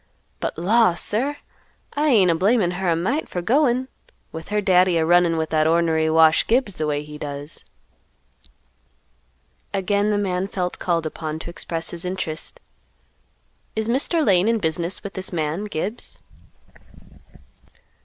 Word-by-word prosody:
But - - -3
law! 200 +2 +3
sir, 260 +11 0 0.6
I 295 +1 0
ain't 205 - +5
a - - +3
blamin' 190 +2 +2
her 180 0 -2
a 165 - +3
mite 235 - -1
for 180 - -3
goin', 255 - +2 0.4
with 160 0 -8
her 210 +1 0
Daddy 185 -3 +3
a 160 - +2
runnin' 175 0 +3
with 160 0 -2
that 155 -1 +2
ornery 160 -1 +2
Wash 160 0 +4
Gibbs 225 -4 +1
the 155 - -1
way 145 0 -1
he 150 0 -10
does." 145 +1 -7 2.1
Again 200 +2 +1
the 210 - +1
man 190 -2 -1
felt 180 -2 -3
called 170 -2 0
upon 155 0 -4
to 165 +2 -7
express 165 -1 -1
his 170 -1 -3
interest; 180 - -4 1.2
"Is 220 0 -1
Mr. 285 +7 +1
Lane 190 -2 +3
in 230 0 +2
business 170 -1 -2
with 200 - -7
this 190 -1 -4
man 160 +3 -2
Gibbs?" 210 +3 -5
180 Hz, 150 wpm, -22 LUFS, 160-210 Hz, 2.1 s, ain't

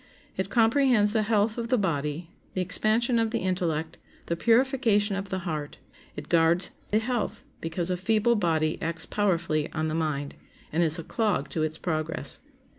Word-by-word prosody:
It 190 0 -2
comprehends 230 -2 +4
the 220 - +3
health 215 +1 +1
of 230 - -3
the 250 +1 +2
body, 165 -3 -2 0.2
the 185 - +1
expansion 220 +6 +2
of 225 -1 +1
the 230 - -1
intellect, 175 -4 -1 0.3
the 170 - -1
purification 230 - +3
of 195 0 -4
the 190 - -1
heart. 155 -4 -4 0.4
It 150 0 -7
guards 170 +2 +3 0.2
the 210 - +2
health, 230 -1 -2 0.2
because 170 +2 -2
a 180 - 0
feeble 220 +5 +2
body 160 -5 0
acts 165 0 -3
powerfully 170 -7 0
on 155 0 -1
the - - -3
mind, 150 -3 -2 0.4
and 160 - +1
is 160 0 +3
a 165 - -5
clog 200 -10 0
to 160 - -2
its 155 0 -1
progress. 155 -4 -2
180 Hz, 175 wpm, -27 LUFS, 160-220 Hz, 0.4 s, comprehends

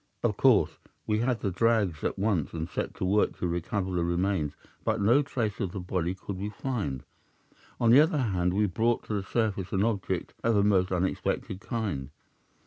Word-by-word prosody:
"'Of - - +2
course, - - +3 0.3
we 105 0 +1
had 120 0 0
the 100 - -1
drags 100 -5 +1
at - - -1
once, 95 -7 0
and 80 0 -3
set - - -4
to - - -2
work 100 +3 +2
to 90 - -1
recover 90 +3 -2
the 90 -2 0
remains, 85 -3 0 0.3
but - - 0
no 115 +8 +5
trace 120 -8 -2
of 95 -2 -2
the 100 - -4
body 90 0 -2
could 95 0 -6
we 100 +2 -3
find. 100 - -3 0.8
On 115 -1 +4
the 130 - +8
other 155 0 +2
hand, 95 -8 0
we 105 +1 +3
brought 115 +5 +1
to - - -5
the 100 - 0
surface 100 -2 -1
an 95 +1 +1
object 110 -4 -1
of 115 -1 +3
a 100 - +4
most 95 -3 +3
unexpected 95 +1 -1
kind. 100 - -3
100 Hz, 195 wpm, -28 LUFS, 90-110 Hz, 0.8 s, the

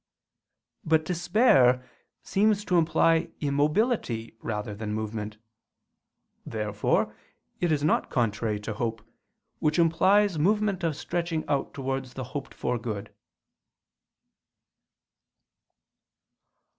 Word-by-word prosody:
But 160 0 +2
despair 165 - +3 0.4
seems 210 +1 +2
to 180 -3 +3
imply 165 +1 +3
immobility 145 - 0
rather 105 -1 -3
than 105 +1 -4
movement. 110 0 -4 1.1
Therefore 105 -2 -1 0.4
it 175 -2 +1
is 145 -2 +1
not 155 - +2
contrary 110 -2 0
to 105 +1 -4
hope, 115 0 -3 0.6
which 155 0 +1
implies 185 +2 +3
movement 200 +2 +1
of 160 -3 0
stretching 170 -1 -2
out 140 -2 -1
towards 135 -1 -3
the 130 - -4
hoped 140 -2 -5
for 125 - -1
good. 105 -3 -5
145 Hz, 95 wpm, -27 LUFS, 115-170 Hz, 1.1 s, despair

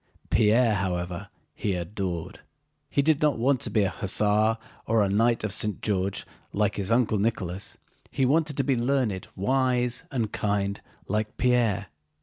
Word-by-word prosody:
Pierre, 110 +2 +4
however, 90 -2 -3 0.2
he 100 -3 -2
adored. 90 -1 -4 0.5
He 140 - +1
did 155 -1 +2
not 150 -3 +2
want 130 +3 +2
to - - -4
be 105 - +2
an 95 - 0
hussar 105 +3 +3 0.3
or 110 -1 +3
a 100 - +1
Knight 115 +4 +2
of 105 -3 -2
St. 105 0 -1
George 100 -2 -1 0.3
like 105 0 +1
his 100 +2 -2
uncle 115 -3 +2
Nicholas; 100 -3 -2 0.3
he 135 - 0
wanted 150 +2 +1
to 140 - +2
be 135 0 +1
learned, 120 -6 0
wise, 125 +2 +1
and 115 -5 -1
kind 100 -1 -1 0.3
like 105 +1 -2
Pierre. 115 -6 +1
110 Hz, 155 wpm, -26 LUFS, 100-125 Hz, 0.5 s, Pierre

